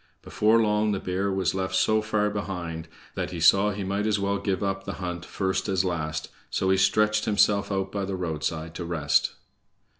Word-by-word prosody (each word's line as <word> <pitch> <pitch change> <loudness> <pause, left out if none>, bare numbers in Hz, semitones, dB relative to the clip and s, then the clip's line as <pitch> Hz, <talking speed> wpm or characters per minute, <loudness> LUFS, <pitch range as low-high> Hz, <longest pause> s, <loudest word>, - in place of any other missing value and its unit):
Before 110 +2 +3
long 105 -1 +2
the 95 - -1
bear 95 +2 -1
was 95 -2 0
left 95 -1 -2
so 110 0 +3
far 105 -1 0
behind 85 -5 -4 0.3
that - - -3
he 85 - -6
saw 95 +5 +5
he 100 -1 -4
might 100 +3 -1
as 105 -1 +2
well 100 0 -1
give 100 -1 -1
up 95 0 -2
the - - -5
hunt 90 -2 -5
first 95 0 -2
as 95 -1 +1
last, 80 -3 -3 0.2
so 95 0 0
he 95 - +4
stretched 105 +2 +3
himself 100 -1 +2
out 95 -1 -1
by 100 -1 -2
the 95 0 -3
roadside 80 -2 -3
to 85 - -5
rest. 80 -4 +1
95 Hz, 200 wpm, -26 LUFS, 90-105 Hz, 0.3 s, saw